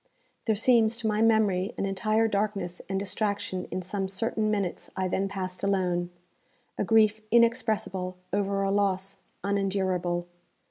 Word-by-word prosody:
There 220 - +2
seems, 230 0 +4
to 230 -1 -1
my 215 0 +1
memory, 215 -3 +3
an - - -1
entire 215 +3 +1
darkness 200 -4 -2
and 195 0 0
distraction 200 -2 -2
in 185 - -3
some 195 +1 -2
certain 215 +2 -1
minutes 200 -4 -2
I 190 -1 0
then 190 +2 0
passed 185 -2 -5
alone 180 -3 +1 0.7
a - - -1
grief 215 0 +4
inexpressible 220 -6 +2 0.2
over 200 0 +1
a 195 - +1
loss 195 -1 0 0.3
unendurable. 190 -3 0
200 Hz, 140 wpm, -28 LUFS, 185-215 Hz, 0.7 s, seems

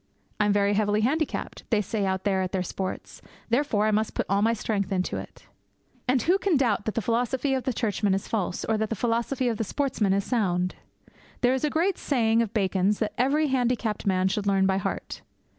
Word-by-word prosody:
'I 210 - +3
am 205 - +3
very 205 0 +2
heavily 210 0 +2
handicapped,' 295 +7 -1
they 220 - +3
say 205 0 -1
out 190 0 -1
there 195 -2 +1
at 185 0 -3
their 185 -1 0
sports, 185 +1 -5 0.3
'therefore 235 -4 +2
I 215 - +2
must 215 +1 0
put - - 0
all 200 +1 +2
my 225 +2 +3
strength 205 -3 -2
into 185 -1 -1
it!' - - -10 0.6
And 255 0 +2
who 365 +4 +3
can 380 -7 +2
doubt 230 -6 +1
that 220 - -2
the 230 - -1
philosophy 245 +5 0
of 260 -1 -1
the 260 - +1
Churchmen 210 -4 0
is 195 - -4
false, 195 -5 -2
or 220 -1 0
that 220 -1 -1
the 225 - -1
philosophy 235 +4 0
of 230 -2 0
the 225 - -1
sportsmen 235 -3 0
is 200 0 +1
sound? 185 -7 0 0.7
There 250 0 +4
is 265 - -2
a 300 - +2
great 345 +5 0
saying 230 -4 +2
of 225 -3 -2
Bacon's 195 -1 +1
that 215 -2 -2
every 290 +4 +2
handicapped 245 -5 0
man 185 -1 +2
should 200 +1 -1
learn 195 -1 +3
by 190 0 +2
heart. 195 0 -4
215 Hz, 220 wpm, -26 LUFS, 200-250 Hz, 0.7 s, There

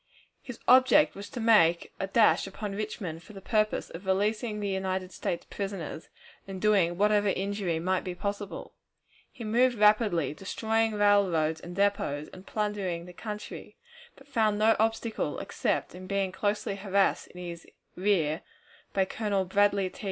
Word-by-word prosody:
His 250 -4 -8
object 260 +4 +6
was 200 +1 -9
to 245 - -6
make 210 -7 +4
a 195 - -2
dash 215 -1 +4
upon 200 +1 -5
Richmond 200 -6 -5
for 215 - -14
the 195 - -9
purpose 215 +2 0
of 180 +4 -9
releasing 210 +3 0
the 205 - -2
United 190 -1 -2
States 170 - -3
prisoners, 195 -5 -5 0.4
and 190 -1 -6
doing 190 -5 +3
whatever 210 +1 +3
injury 195 -3 -1
might 185 +2 0
be 180 -1 -5
possible. 200 +1 -5 0.6
He 235 - -9
moved 240 +3 +2
rapidly, 210 -6 +3
destroying 220 +5 -1
railroads 185 -7 +3
and 175 0 -8
depots, 195 -7 0
and 185 +1 -12
plundering 200 -5 -2
the 180 - -11
country, 210 +2 -7 0.4
but - - -18
found 220 -6 +1
no 220 +1 +4
obstacle 225 0 -1
except - - -2
in 185 +1 -9
being 195 -1 0
closely 205 +1 -1
harassed 195 -1 +1
in 180 - -13
his 170 -1 -7 0.3
rear 180 -6 +1 0.5
by 190 -1 +2
Colonel 200 -1 -1
Bradley 200 +1 +2
T. - - -15
200 Hz, 155 wpm, -28 LUFS, 185-215 Hz, 0.6 s, object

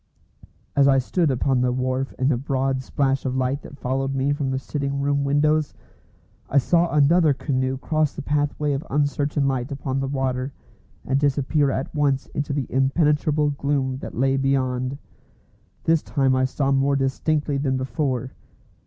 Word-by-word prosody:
As 140 -1 +5
I 135 -1 +5
stood 160 +5 +1
upon 130 0 +1
the 125 0 +2
wharf 130 +1 -1
in 130 - +1
the 145 - +2
broad 135 +1 -1
splash 135 0 0
of 130 -1 -2
light 130 +2 0
that 140 - -12
followed 135 +1 -2
me 135 +2 +1
from 145 -2 -2
the 130 - -1
sitting 140 0 -3
room 140 0 +1
windows, 150 +2 +1 0.7
I 140 - +1
saw 170 +5 +3
another 150 +1 +4
canoe 130 -1 -1
cross 155 +1 0
the 150 - -6
pathway 145 0 0
of 135 +2 -3
uncertain 145 0 0
light 130 0 -2
upon 135 -1 -3
the 135 - -2
water, 135 -1 -2 0.5
and 135 +1 +1
disappear 145 0 +1
at 135 0 -3
once 140 -3 +1
into 145 0 -2
the 140 -2 -1
impenetrable 150 +2 +2
gloom 140 -2 -1
that - - -8
lay 135 +2 +2
beyond. 130 -1 0 0.9
This 165 -1 +3
time 135 -3 +1
I 130 0 +2
saw 135 +1 -1
more 140 +1 +2
distinctly 145 +2 0
than 135 -2 0
before. 130 -1 -2
135 Hz, 165 wpm, -23 LUFS, 130-145 Hz, 0.9 s, As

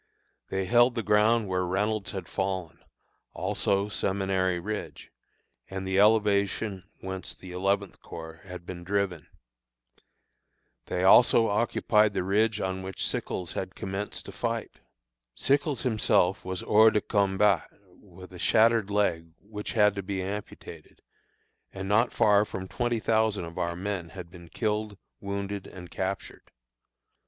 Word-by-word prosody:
They 95 0 -1
held 120 +4 +4
the 115 - -2
ground 105 +1 +3
where 90 -1 0
Reynolds 100 +3 -1
had 95 -3 -6
fallen, 95 -3 -3 0.5
also 100 +1 0
Seminary 95 -3 0
Ridge, 105 +4 -6 0.6
and 95 0 -5
the 95 0 +1
elevation 100 -2 +2
whence 95 0 -5
the 90 - -11
Eleventh 100 +1 -1
Corps 80 0 -9
had 90 -3 -9
been 85 -1 -7
driven. 95 -3 -1 1.6
They 90 - -1
also 115 +3 +6
occupied 105 -1 +2
the - - 0
ridge 105 +3 +1
on 95 -1 -2
which 95 0 -4
Sickles 90 -3 -3
had - - -5
commenced 95 +2 -5
to - - -8
fight. 115 +3 -4 0.6
Sickles 140 -2 +1
himself 110 -4 +2
was 95 -1 -4
hors 110 +1 +6
de 105 - +2
combat, 100 -2 +2 0.3
with 95 -1 -14
a 90 - -10
shattered 115 0 +4
leg 100 -5 +1
which 105 +1 -7
had 105 -3 +4
to 100 - -4
be 95 -1 -3
amputated, 100 +2 -8 0.7
and 95 0 -6
not 110 +4 +3
far 105 -3 +4
from 95 -3 -6
twenty 120 +2 -1
thousand 110 -4 +1
of 85 0 -8
our 85 0 -1
men 95 -2 -4
had 90 -1 -9
been 85 -2 -13
killed, 105 +1 -2 0.2
wounded, 100 0 -4
and 90 -2 -11
captured! 95 0 -5
100 Hz, 140 wpm, -28 LUFS, 95-105 Hz, 1.6 s, also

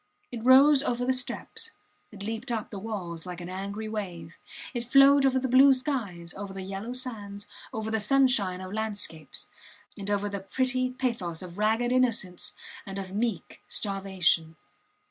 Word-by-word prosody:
It 235 -2 -6
rose 270 +3 +7
over 245 -4 -1
the 260 - +3
steps, 255 -1 -2 0.4
it 200 -2 -9
leaped 225 +4 -4
up 225 -2 -3
the 200 - -5
walls 185 -6 -5
like 180 -1 -6
an 175 0 -7
angry 200 +3 -4
wave, 180 -7 -6 0.3
it 240 -2 -2
flowed 275 +1 +7
over 260 0 +2
the 260 0 0
blue 265 +2 +7
skies, 215 - -3
over 200 0 -7
the 190 -1 -6
yellow 195 +5 -5
sands, 210 -6 -5 0.3
over 220 0 -3
the 220 - +1
sunshine 210 -6 +3
of 185 +1 -7
landscapes, 205 -7 -3 0.5
and 200 -1 -6
over 205 0 +1
the 200 -1 -3
pretty 255 +5 0
pathos 235 -10 -3
of 180 +2 -9
ragged 225 +3 +2
innocence 230 -8 +1 0.3
and 195 0 -7
of 190 -1 -5
meek 215 -5 -2
starvation. 190 -5 0
215 Hz, 165 wpm, -28 LUFS, 190-250 Hz, 0.5 s, rose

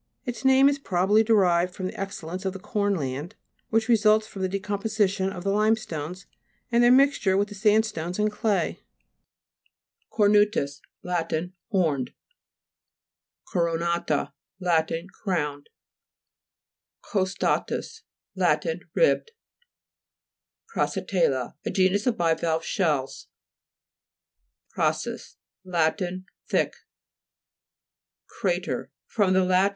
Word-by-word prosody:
Its 240 -3 -5
name 265 +1 +6
is 285 0 +1
probably 195 -2 +2
derived 180 -5 +3
from 190 - -4
the 185 - -5
excellence 185 -2 -5
of 190 -1 -2
the 195 - -7
corn 205 0 0
land, 145 +4 -4 0.3
which 225 0 +1
results 215 -2 +4
from 200 -3 -9
the 185 - 0
decomposition 200 0 0
of 180 -2 -7
the 195 - 0
limestones, 195 -5 -1 0.5
and 235 0 +4
their 240 - +6
mixture 260 -8 +4
with 205 +1 +1
the - - -8
sandstones 205 -4 +1
and 210 0 +1
clay. 210 -1 -1 1.3
CORNU'TUS 205 -9 +2 0.2
Lat. 175 -2 -2 0.4
Horned. 160 - 0 1.4
CORONA'TA 170 -3 0 0.3
Lat. 170 -4 +1 0.3
Crowned. 150 -7 -2 1.3
COSTA'TUS 195 - -1 0.3
Lat. - - +2 0.3
Ribbed. 485 -1 +2 1.4
CRAG - - 0
FORMATION - - -3
(p. - - -4
84). - - +5
CRASSATE'LLA - - -3
A - - -2
genus 195 +3 +2
of 235 -2 +1
bivalve 165 -1 +1
shells. 150 -9 -1 1.5
CRA'SUS - - -2 0.3
Lat. 175 0 0 0.5
Thick. - - +1 1.7
CHA'TER - - -1 0.2
fr. 210 -3 +1
lat. 185 +1 +3
195 Hz, 105 wpm, -26 LUFS, 170-215 Hz, 1.7 s, name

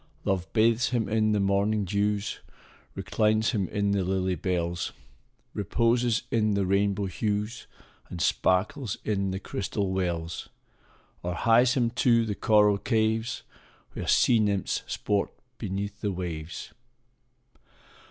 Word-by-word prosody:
Love 95 -3 -1
bathes 115 +1 +3
him 120 -3 0
in 110 0 +2
the 105 - +2
morning 100 +1 +1
dews, 100 +2 -1 0.6
Reclines 110 +3 +1
him 100 -7 -1
in 100 +1 0
the 100 -1 +1
lily 95 0 0
bells, 85 0 -2 0.6
Reposes 115 +3 +1
in 110 -3 +2
the 100 -1 +1
rainbow 100 +1 +1
hues, 105 +6 -3 0.4
And 90 - -6
sparkles 95 - +1
in 100 -2 0
the 95 0 -3
crystal 100 0 -3
wells, 85 -3 -3 0.7
Or 90 0 -3
hies 120 - +4
him 120 -3 +1
to 115 -2 +4
the 105 - -2
coral 105 -1 +3
caves, 110 0 0 0.5
Where - - -5
sea 120 -2 +4
nymphs 100 -3 0
sport 100 -1 -1 0.3
beneath 100 -1 -4
the 105 - 0
waves. 85 -3 -6
100 Hz, 125 wpm, -27 LUFS, 95-110 Hz, 0.7 s, hies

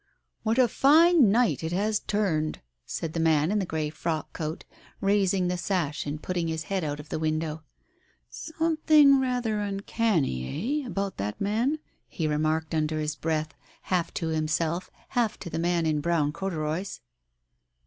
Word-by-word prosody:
" - - -52
What 225 +1 0
a 255 -2 +6
fine 305 - +5
night 230 -3 +2
it 160 - -2
has 210 +3 +1
turned! 170 -7 -1
" - - -54
said 160 -1 -4
the 165 - -2
man 160 0 +3
in 210 - +2
the 190 - -2
grey 155 -2 -2
frock 155 0 -3
coat, 155 +1 -5 0.3
raising 195 -2 +2
the 180 0 -1
sash 170 -7 -1
and 145 +1 -3
putting 175 -2 -1
his 160 0 -2
head 190 +2 -2
out 145 -1 -3
of 150 0 -10
the - - -2
window.... 155 0 -1 0.7
"Something 310 -3 +3
rather 245 -4 0
uncanny, 200 - -1
eh, - - -6
about 200 -4 -3
that 105 +2 -3
man? 230 +9 +1 0.2
" - - -43
he 160 - -3
remarked 155 +1 0
under 155 0 0
his 150 0 -2
breath, 155 -1 -2 0.4
half 175 -2 +1
to 165 - -2
himself, 160 +2 -1 0.2
half 240 -4 0
to 170 - -8
the - - -2
man 170 0 +1
in 155 -2 +1
brown 155 -2 +1
corduroys. 170 0 -3
170 Hz, 170 wpm, -27 LUFS, 155-210 Hz, 0.7 s, a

